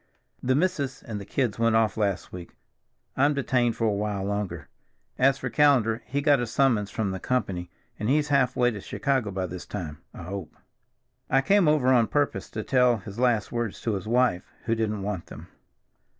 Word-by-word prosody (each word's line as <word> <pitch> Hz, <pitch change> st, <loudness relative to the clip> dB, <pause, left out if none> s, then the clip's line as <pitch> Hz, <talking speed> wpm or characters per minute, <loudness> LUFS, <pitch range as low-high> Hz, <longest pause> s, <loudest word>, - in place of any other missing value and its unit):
"The 130 Hz, +1 st, +1 dB
missus 145 Hz, -5 st, -1 dB
and 105 Hz, -4 st, -6 dB
the -, -, -8 dB
kids 120 Hz, -6 st, -1 dB
went 115 Hz, -1 st, +3 dB
off 110 Hz, -2 st, +2 dB
last 100 Hz, -5 st, -1 dB
week; 90 Hz, -2 st, -9 dB, 0.6 s
I'm 145 Hz, +2 st, +3 dB
detained 125 Hz, -4 st, +1 dB
for 115 Hz, -, -1 dB
a 110 Hz, -, +3 dB
while 100 Hz, -1 st, -2 dB
longer. 100 Hz, -4 st, -3 dB, 0.5 s
As 135 Hz, +1 st, +4 dB
for -, -, -4 dB
Callender; 125 Hz, -6 st, +3 dB
he 140 Hz, +2 st, -1 dB
got 145 Hz, -2 st, +4 dB
a 120 Hz, -, -2 dB
summons 115 Hz, -4 st, +2 dB
from 100 Hz, -1 st, -2 dB
the 95 Hz, -, -4 dB
company, 95 Hz, -7 st, -2 dB, 0.3 s
and 105 Hz, -, -1 dB
he's 150 Hz, +2 st, +2 dB
half 135 Hz, -3 st, +2 dB
way 125 Hz, -1 st, +3 dB
to 105 Hz, -3 st, -7 dB
Chicago 130 Hz, -2 st, -1 dB
by 95 Hz, -1 st, -2 dB
this 90 Hz, 0 st, -7 dB
time, 80 Hz, -7 st, -6 dB
I -, -, -10 dB
hope. 90 Hz, -2 st, -7 dB, 0.7 s
I 135 Hz, -, +4 dB
came 195 Hz, +4 st, +3 dB
over 150 Hz, -4 st, +3 dB
on 120 Hz, -3 st, +4 dB
purpose 145 Hz, -1 st, -1 dB
to -, -, -5 dB
tell 125 Hz, -2 st, +3 dB
his 100 Hz, +2 st, -9 dB
last 120 Hz, -5 st, +1 dB
words 120 Hz, -3 st, -3 dB
to 115 Hz, -, -1 dB
his 100 Hz, +1 st, -4 dB
wife, 120 Hz, -6 st, +1 dB
who 115 Hz, -, +1 dB
didn't 110 Hz, -3 st, -1 dB
want 100 Hz, -4 st, -4 dB
them." -, -, -11 dB
115 Hz, 195 wpm, -26 LUFS, 100-130 Hz, 0.7 s, As